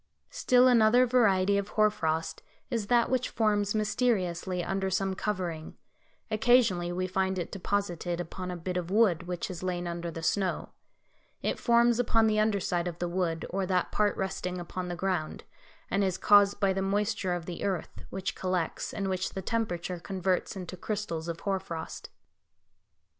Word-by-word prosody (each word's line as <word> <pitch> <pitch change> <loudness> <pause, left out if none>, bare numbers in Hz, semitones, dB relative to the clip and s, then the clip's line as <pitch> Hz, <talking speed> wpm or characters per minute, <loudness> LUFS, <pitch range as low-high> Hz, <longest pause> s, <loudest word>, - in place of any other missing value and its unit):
Still 255 - +4
another 245 0 +5
variety 200 -5 +3
of 200 - -4
hoar 215 0 +5
frost 160 -3 -2 0.3
is 225 -4 -1
that 240 0 +4
which 255 -1 0
forms 210 -2 +1
mysteriously 190 -5 0
under 195 +2 -1
some 190 +1 0
covering; 180 -6 -4 0.5
occasionally 215 -6 +3
we 185 +1 -1
find 190 0 0
it 175 - -4
deposited 180 -3 -2
upon 180 +2 -5
a 180 - -4
bit 180 +2 -3
of 175 -1 -3
wood 190 -5 +3
which 180 -1 -3
has 180 -2 -6
lain 180 -1 -2
under 170 0 -4
the 165 0 -7
snow; 190 +1 0 0.7
it - - -1
forms 235 0 +4
upon 225 -2 +3
the 215 -1 +2
underside 200 -5 +1
of 170 -1 -5
the 175 - -2
wood, 170 -2 -1
or 190 0 -1
that 185 -1 0
part 210 -1 +1
resting 180 -1 -3
upon 180 +1 -5
the 175 - -3
ground, 175 -3 -2 0.5
and 200 +1 +2
is 185 -2 0
caused 205 -1 +5
by 195 -2 +2
the 190 - -1
moisture 200 -1 0
of 175 -2 -5
the 175 -1 -6
earth, 190 -5 -3
which 190 0 -3
collects, 185 -3 -2
and 195 -2 -2
which 185 0 -2
the 190 - -3
temperature 180 -5 -2
converts 185 +1 -1
into 185 -1 -6
crystals 180 -4 -4
of 170 0 -5
hoar 195 -1 0
frost. 170 -4 -7
190 Hz, 170 wpm, -29 LUFS, 175-210 Hz, 0.7 s, another